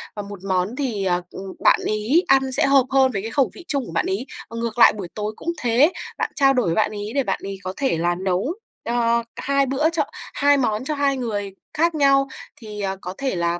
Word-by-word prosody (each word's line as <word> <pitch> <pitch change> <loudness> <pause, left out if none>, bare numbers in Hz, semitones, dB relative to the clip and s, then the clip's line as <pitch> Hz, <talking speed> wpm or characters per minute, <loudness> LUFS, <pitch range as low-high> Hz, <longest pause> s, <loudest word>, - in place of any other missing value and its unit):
và 205 - -4
một 200 -2 -9
món 190 +3 -1
thì, 235 -8 -2
à, 175 -1 +1
ừm, 190 0 -8
bạn - - +5
ấy 220 - +2
ăn 265 -1 +3
sẽ 260 - +3
hợp 275 -2 +5
hơn 265 -1 +4
với 195 - -2
cái 225 +2 -5
khẩu 275 +1 +2
vị 350 - -12
chung 280 -4 -1
của - - -9
bạn 165 - 0
ấy. 195 +7 -2 0.2
Ngược 230 0 -4
lại 225 - +8
buổi 200 -4 -6
tối 210 0 -3
cũng 340 - -3
thế, 250 +7 +4 0.3
bạn - - -2
trao 275 -2 +4
đổi 250 -5 +1
với 165 - +1
bạn 215 - +2
ấy 210 0 -5
để 275 - +2
bạn 195 - -1
ấy 195 0 -5
có 185 0 -4
thể 265 - 0
là 175 +1 +1
nấu, 190 - -1 0.3
ờ, 235 0 +1
cả - - -7
2 275 0 +2
bữa 275 +4 +1
cho 330 -3 +1 0.3
2 285 0 +4
món 220 -4 0
cho 305 +2 -1
2 280 -1 +1
người 205 -5 -3 0.2
khác 330 +1 +1
nhau, 275 -2 +4 0.3
thì, 210 -2 -8
ờ, 195 -1 -2
có 180 - -6
thể 270 -6 -2
là, 170 0 0
235 Hz, 245 wpm, -22 LUFS, 195-275 Hz, 0.3 s, lại